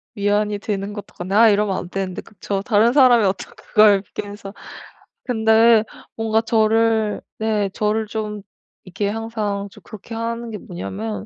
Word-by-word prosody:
위안이 205 0 0
되는 200 -1 -4
것도 205 -1 -9
같 180 +2 -7
아 225 +2 +6
이러면 205 -1 +1
안 175 - -6
되는데 190 -1 -4
그쵸. 200 -1 -5
다른 225 +1 +3
사람이 250 -5 +6
어떻게 190 -1 -2
그걸 205 -2 +5
그렇게 205 +1 -7
해서 200 -1 -9 0.7
근데 225 -2 +4 0.3
뭔가 225 0 +1
저를 225 -1 +1 0.2
네 215 -2 0
저를 220 0 0
좀 210 -1 -4 0.4
이렇게 200 +2 -3
항상 210 -2 -3
좀 - - -16
그렇게 215 +1 -11
하는 230 0 -4
게 210 - -5
뭐냐면 105 - -6
210 Hz, 310 characters per minute, -20 LUFS, 200-225 Hz, 0.7 s, 아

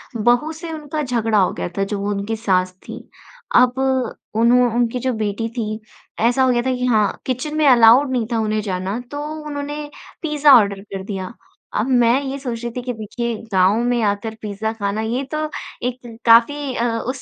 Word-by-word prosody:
बहू 240 +7 +2
से 325 +1 -7
उनका 305 0 -4
झगड़ा 230 -4 0
हो 185 - +3
गया - - -4
था 195 - +2
जो 205 - -1
वो 200 +1 -2
उनकी 205 +2 -2
सास 185 -4 0
थी। - - -7 0.6
अब 250 0 +5 0.6
उन्हों 240 +2 +4
उनकी 240 +1 +1
जो 255 +1 -1
बेटी 215 0 -2
थी, 215 -1 -2 0.4
ऐसा 245 +4 +3
हो 260 - +3
गया 240 -1 +2
था 260 +1 0
कि 250 0 -2
हाँ 215 -4 +1
किचन 260 +4 -3
में 305 - +3
अलाउड 250 +2 +6
नहीं 245 -3 0
था 230 - +1
उन्हें 215 -1 0
जाना। 190 +2 -3
तो 290 0 -4 0.2
उन्होंने 290 0 -5 0.3
पिज़्ज़ा 300 -3 +4
ऑर्डर 200 -2 +1
कर 195 -2 -7
दिया। 195 +2 -5 0.4
अब 220 +5 0
मैं 235 +3 +4
ये 270 +1 -4
सोच 240 -4 -5
रही 235 - -3
थी 250 - -2
कि 250 0 -4
देखिए 230 +2 -4 0.2
गाँव 190 +1 +4
में 245 -1 +1
आकर 210 +2 -1
पिज़्ज़ा 215 +1 -3
खाना 205 0 -2
ये 235 +5 -2
तो 310 0 -2 0.4
एक 240 -2 -7
काफ़ी 255 +4 +4
अ, 240 +1 0
उस 260 +4 -4
235 Hz, 195 wpm, -20 LUFS, 215-260 Hz, 0.6 s, अलाउड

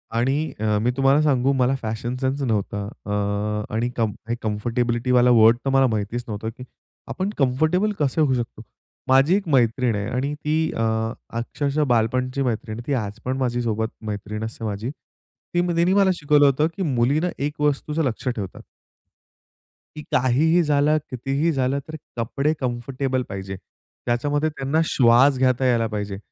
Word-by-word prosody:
आणि 135 +6 0
अ, 105 -1 +1
मी 120 +3 +1
तुम्हाला 135 +2 +4
सांगू, 135 -3 +2
मला 130 0 +2
फॅशन 115 +2 -3
सेन्स 135 +2 -1
नव्हता 105 -5 -1 0.2
अ, 105 - -4 0.6
आणि 120 +2 0
कम 110 -3 0 0.3
कम्फर्टेबिलिटीवाला 120 +3 +1
वर्ड 115 0 +6
तर - - +1
मला 135 0 +4
माहितीच 110 +1 -2
नव्हतं, 110 0 -4
की 125 - -8 0.5
आपण 190 +1 -2
कम्फर्टेबल 155 +10 +2
कसे 145 +1 +1
होऊ 145 -4 +3
शकतो? 120 -2 -4 0.5
माझी 135 +7 +5
एक 200 -3 -2
मैत्रीण 125 -4 +2
आहे 100 0 -2
आणि 135 +3 -1
ती 150 +1 -2 0.2
अ, - - -1 0.6
अक्षरशः 145 +5 -1
बालपणची 125 +4 0
मैत्रीण 110 -3 -2
आहे, 120 - -9
ती 145 - 0
आज 105 -5 -3
पण 130 +1 -1
माझीसोबत 120 -4 -1 0.2
मैत्रीण 105 +1 -4
असते 115 0 -6
माझी. 105 +3 -3 0.6
ती 175 - +3
म 175 -1 -1
तिनी 175 +2 +3
मला 200 -1 +4
शिकवलं 145 -2 +4
होतं, 140 +3 +3
की 195 - -2
मुलीनं 140 +4 +1
एक 145 +2 -3
वस्तूचं 150 +2 0
लक्ष 130 -1 -3
ठेवत. 105 -7 -3 1.4
की 150 - -6
काहीही 145 +7 +3
झालं, 150 0 +3
कितीही 135 +6 0
झालं 135 -1 0
तर 155 - -7 0.2
कपडे 140 +6 0
कम्फर्टेबल 130 +1 -2
पाहिजे. 95 -1 -5 0.5
त्याच्यामध्ये 145 +6 0
त्यांना 150 +1 -1
श्वास 130 +2 +5
घेता 130 0 +2
यायला 120 -3 +2
पाहिजे. 100 -1 -3
130 Hz, 155 wpm, -23 LUFS, 115-145 Hz, 1.4 s, वर्ड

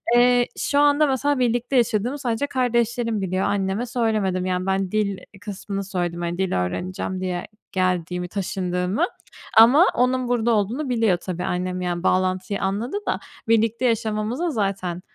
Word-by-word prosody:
Iıı, 245 0 +5
şu 285 - +1
anda 290 +1 +4
mesela 275 +1 +1
birlikte 245 +2 0
yaşadığımı 240 +3 +1
sadece 245 +1 -1
kardeşlerim 235 -4 0
biliyor, 185 0 -1
anneme 200 +3 0
söylemedim. 215 -6 0
Yani 185 0 -1
ben 190 -1 0
dil 205 -2 0 0.2
kısmını 200 -1 -5
söyledim. 175 -3 -3
Hani, 175 0 -2
dil 190 -1 -1
öğreneceğim 185 - -4
diye 180 -1 -2 0.3
geldiğimi, 180 -1 -1
taşındığımı 180 - -1 0.5
ama 255 +10 +8
onun 250 0 +1
burada 240 -1 +1
olduğunu 230 +7 0
biliyor 225 -7 +2
tabii 180 0 -5
annem. 180 +1 -2
Yani 175 -1 -2
bağlantıyı 185 +1 0
anladı 210 - -1
da, - - 0 0.3
birlikte 225 +2 +2
yaşamamıza 225 +6 0
zaten, 195 - -2
205 Hz, 145 wpm, -23 LUFS, 185-240 Hz, 0.5 s, ama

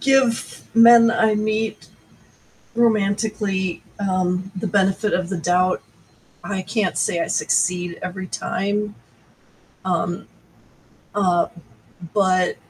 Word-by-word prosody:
give 265 -4 +1
men 230 0 +8
I 220 -1 +2
meet 215 +1 -2 0.9
romantically, 205 -4 0 0.2
um, 185 -1 -1
the 200 +3 -3
benefit 195 +2 +1
of 180 0 0
the 190 - -2
doubt. 180 +2 +1 0.6
I 195 -2 -3
can't 205 0 -1
say 170 - 0
I - - 0
succeed 175 -1 0
every 185 +1 -5
time. 205 +3 -2 0.9
Um, - - -2 0.9
uh, 180 -4 +2 0.7
but 185 -3 +2
195 Hz, 100 wpm, -21 LUFS, 185-215 Hz, 0.9 s, men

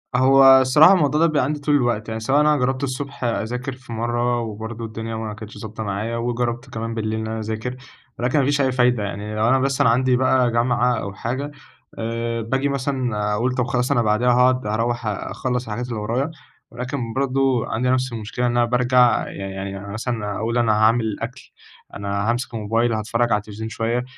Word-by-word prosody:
هو 135 +2 +5 0.2
الصراحة 150 +8 +6
الموضوع 150 -4 +2
ده 165 - +6
بيبقى 150 -5 +1
عندي 150 +2 -2
طول 145 +1 +1
الوقت، 120 -5 0
يعني 110 - -3
سواء 135 +6 +2
أنا 150 0 +4
جربت 130 +1 -1
الصبح 140 0 -4
أذاكر 120 +4 -2
في 130 -2 -11
مرة، 120 +1 0
وبرضه 110 +1 -6
الدنيا 110 0 -5
ما 110 -1 -4
كانتش 110 0 -10
ضابطة 110 0 -6
معايا، 110 +3 -3
وجربت 120 +1 -2
كمان 115 -1 -4
بالليل 110 0 -2
إن 110 - -4
أنا 110 0 -3
أذاكر، 110 +3 -4 0.4
ولكن 125 +5 +1
ما 135 - +2
فيش 145 0 +2
أي 130 -1 +2
فايدة. 125 -3 +2
يعني 105 +1 -5
لو 110 +2 +2
أنا 130 +1 +4
بس 135 0 0
أنا - - +5
عندي 125 +2 +3
بقى 125 -1 +3
جامعة 120 +1 +2
أو 100 - -5
حاجة، 130 +7 -4 0.5
آآ 115 0 -2
باجي 130 +5 -1
مثلًا 125 -6 -1
أقول 120 +5 0
طب 125 -2 +1
خلاص 125 +1 0
أنا 120 - +3
بعديها 110 +3 +2
هاقعد 125 -1 +3
هاروّح 115 +2 -1
أ 100 -2 -3
أخلّص 125 +2 -3
حاجات 120 +4 -3
اللي 115 -3 -3
ورايا، 125 +9 -1 0.4
ولكن 125 -1 -4
برضه 135 -2 +1
عندي 125 +3 -1
نفس 130 0 +1
المشكلة، 115 +2 -3
إن 120 - +2
أنا 120 - +4
بارجع 125 -1 +3
يعني 95 0 -6
يعني 95 0 -5
أنا 100 +1 -9
مثلًا 110 -3 -3
أقول 115 +2 -1
أنا 115 -2 +3
هاعمل 110 0 +2
أكل، 125 +3 -7 0.4
أنا 100 +2 -2
هامسك 120 +1 -2
الموبايل، 115 +2 0
هاتفرج 115 +2 0
على 105 - +3
التلفزيون 105 +1 -7
شوية، 115 +2 -1
120 Hz, 200 wpm, -22 LUFS, 110-130 Hz, 0.5 s, الصراحة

